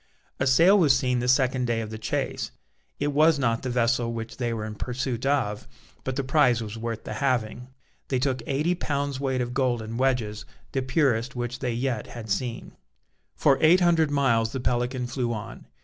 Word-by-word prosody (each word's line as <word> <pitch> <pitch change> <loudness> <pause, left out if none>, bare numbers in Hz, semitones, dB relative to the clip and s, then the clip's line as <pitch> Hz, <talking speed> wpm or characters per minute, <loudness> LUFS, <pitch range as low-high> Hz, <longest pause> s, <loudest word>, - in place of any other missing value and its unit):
A 130 - +1
sail 170 +10 +6
was 145 -7 +5
seen 125 -2 0
the 125 - -2
second 130 -1 +2
day 115 -1 0
of 110 -1 -5
the 110 - -6
chase: 110 - -2 0.5
it 145 0 0
was 155 +2 +5
not 115 -4 0
the 130 - -3
vessel 120 -1 +1
which 115 0 -6
they 120 -2 -1
were 110 -2 -3
in 110 - -5
pursuit 125 +2 -3
of, 105 -8 0 0.4
but 130 - -3
the 140 - -1
prize 130 -3 +3
was 110 -1 -5
worth 115 0 -4
the - - -6
having. 125 -3 -1 0.4
They 130 - 0
took 130 0 0
eighty 150 +6 +1
pounds' 145 -5 -2
weight 130 -2 -1
of 120 0 -3
gold 125 -2 +1
in 110 +1 -6
wedges, 120 -5 0 0.3
the 135 - -1
purest 130 -2 +1
which 120 0 -4
they 125 -3 -2
yet 120 -2 -2
had 110 -3 -8
seen. 115 +4 -2 0.6
For 140 -3 +3
eight 170 +4 +6
hundred 165 -3 +3
miles 115 -6 +2
the 135 - -2
Pelican 125 +1 -1
flew 120 -1 -2
on. 105 -2 -8
125 Hz, 195 wpm, -26 LUFS, 115-135 Hz, 0.6 s, sail